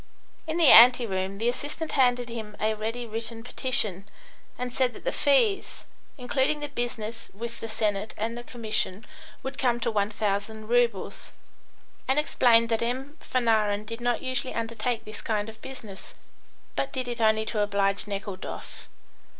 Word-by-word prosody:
In 315 +1 -1
the 330 -4 +7
ante 245 +1 +9
room 190 -1 -2
the 225 +3 -1
assistant 290 +6 -3
handed 245 -3 +3
him 220 -3 -7
a 215 +1 +1
ready 225 +3 -3
written 225 0 -5
petition, 220 -7 -1 0.5
and 250 0 -4
said 255 -1 +1
that - - -11
the - - 0
fees, 390 - +2 0.3
including 265 +3 +1
the 295 0 -4
business 235 -4 -4
with 235 +2 -5
the 225 - -5
Senate 215 -1 -1
and 225 +2 -2
the 240 - -7
commission, 220 -4 -3 0.4
would 265 +1 -5
come 240 -2 +2
to 235 - 0
1,000 210 +1 -1
roubles, 235 -4 +1 0.7
and 265 +2 +3
explained 235 -6 +4
that 225 -1 +1
M. 260 +5 -2
Fanarin 215 -4 +1
did 230 +2 -7
not 245 0 0
usually 255 0 -2
undertake 230 0 -2
this 215 0 -8
kind 215 -1 -1
of 220 0 -13
business, 220 -7 -10 0.6
but 275 - -1
did 255 -2 -3
it 240 -1 -4
only 220 0 +3
to 220 -1 -2
oblige 200 0 +1
Nekhludoff. 200 -1 -6
230 Hz, 160 wpm, -27 LUFS, 215-250 Hz, 0.7 s, ante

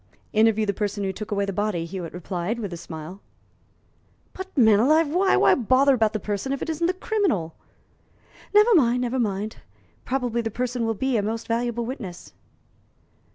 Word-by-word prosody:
"Interview 220 0 +3
the 200 - 0
person 205 0 -2
who 190 -1 -2
took 210 +2 -7
away 200 -1 0
the 195 - -4
body," 205 -4 -1
Hewitt 175 -1 -6
replied, 180 +4 -3
with 205 -6 -5
a - - -4
smile. 165 +3 -9 1.1
"But, 380 0 -6
man 220 -5 +6
alive, 310 +6 +4
why? 370 +5 +3
Why - - +5
bother 260 +3 +3
about 220 -3 +2
the 215 - -1
person 205 +6 -3
if 275 - -1
it - - -2
isn't 325 +2 0
the 365 - +1
criminal?" 365 - -1 1.0
"Never 420 +3 +6
mind 250 - +4
never 250 +1 -1
mind; 210 -1 -2 0.5
probably 245 -3 -1
the 225 - -3
person 245 +1 -2
will 225 - 0
be 265 +2 0
a - - +2
most 225 +2 -3
valuable 235 0 -1
witness." 190 - -7
225 Hz, 180 wpm, -24 LUFS, 200-260 Hz, 1.1 s, man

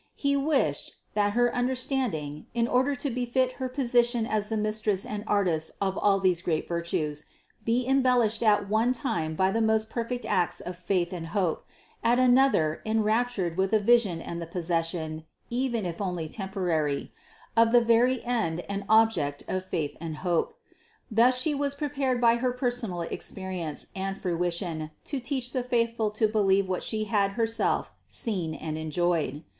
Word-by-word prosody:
He 280 -1 +1
wished, 280 0 +1 0.2
that 205 -1 +1
her 245 +1 +2
understanding, 245 - -1
in 235 0 +2
order 260 +3 +2
to 275 +1 -2
befit 250 +1 0
her 260 - -1
position 240 -3 +2
as 215 -2 -1
the 220 - -1
Mistress 215 -2 0
and 210 0 -4
Artist 175 -6 +1
of 195 0 +1
these 180 -2 +3
great 160 -3 -1
virtues 165 -3 -2 0.4
be 235 +3 +1
embellished 250 -4 +3
at 205 -3 +3
one 220 +4 +2
time 170 - -2
by 190 +3 +2
the 225 - 0
most 220 0 +1
perfect 245 +1 -3
acts 175 -2 +1
of 180 - -6
faith 180 0 -1
and 165 -2 -5
hope, 180 -2 -1 0.4
at 235 +1 +4
another 250 - +3
enraptured 220 -4 0
with 190 0 +2
the 215 +1 +3
vision 205 -6 +3
and 170 0 -5
the 165 - -5
possession 165 -2 -2 0.3
(even 240 -4 -1
if 170 +2 -4
only 180 -4 -2
temporary), 175 -7 -2 0.4
of 230 0 +5
the 240 - +7
very 235 +2 +3
End 215 -9 -1
and 200 +1 -5
Object 215 -11 +3
of 185 0 -2
faith 165 -6 -3
and 160 -2 -5
hope. 175 - 0 0.6
Thus 245 +3 +4
She 300 +4 +2
was 280 0 -1
prepared 275 -3 -1
by 235 -1 +4
her 250 +1 0
personal 245 -8 -1
experience 175 -2 -4
and 195 0 -3
fruition 170 -3 -2 0.2
to 280 - -2
teach 250 -1 -2
the 255 - -1
faithful 230 -3 0
to 215 +1 +1
believe 200 -2 +2
what 185 -1 -2
She 215 -1 -2
had 200 -2 +1
herself 225 +1 0
seen 180 -8 -3
and 155 -1 -5
enjoyed. 160 -2 -1
210 Hz, 160 wpm, -27 LUFS, 175-240 Hz, 0.6 s, the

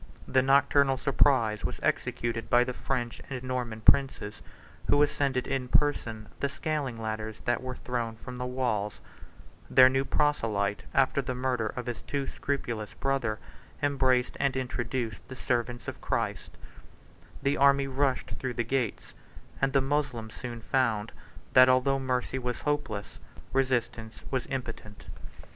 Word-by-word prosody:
The 130 - +4
nocturnal 140 0 +4
surprise 125 -6 +3
was - - -3
executed 115 -1 -1
by 120 0 +6
the 125 - -3
French 120 -2 -3
and 130 -2 -5
Norman 125 -3 -3
princes, 130 -5 +3 0.5
who 145 0 +5
ascended 140 -3 0
in 135 -2 -2
person 115 -6 +1
the 140 - 0
scaling 145 -6 -3
ladders 110 -1 -4
that 120 +1 0
were 130 0 -5
thrown 120 -3 -3
from 125 +2 -9
the 125 0 -3
walls: 120 -5 -1 0.7
their 130 0 +8
new 135 +1 +1
proselyte, 110 -9 +1
after 135 +1 +3
the 130 -1 -3
murder 125 -3 0
of 125 +3 -5
his 120 -2 -4
too 140 -1 -2
scrupulous 120 -7 -3
brother, 135 -6 0 0.5
embraced 130 -3 +2
and 135 -1 +1
introduced 120 -3 -3
the 130 - -8
servants 120 -1 -2
of - - -6
Christ; - - -2 0.9
the 140 +1 +2
army 140 0 +5
rushed 135 0 0
through 130 -2 -4
the 120 - 0
gates; 120 -2 -2 0.5
and 135 0 +2
the 135 0 +3
Moslems 135 -5 -1
soon 120 -2 -7
found, 115 -4 0 0.4
that 130 0 +8
although 130 +2 +3
mercy 130 0 -1
was 125 -1 -3
hopeless, 145 -9 -2 0.3
resistance 120 -4 -1
was 130 -3 -1
impotent. 115 -5 -6
130 Hz, 145 wpm, -29 LUFS, 115-135 Hz, 0.9 s, their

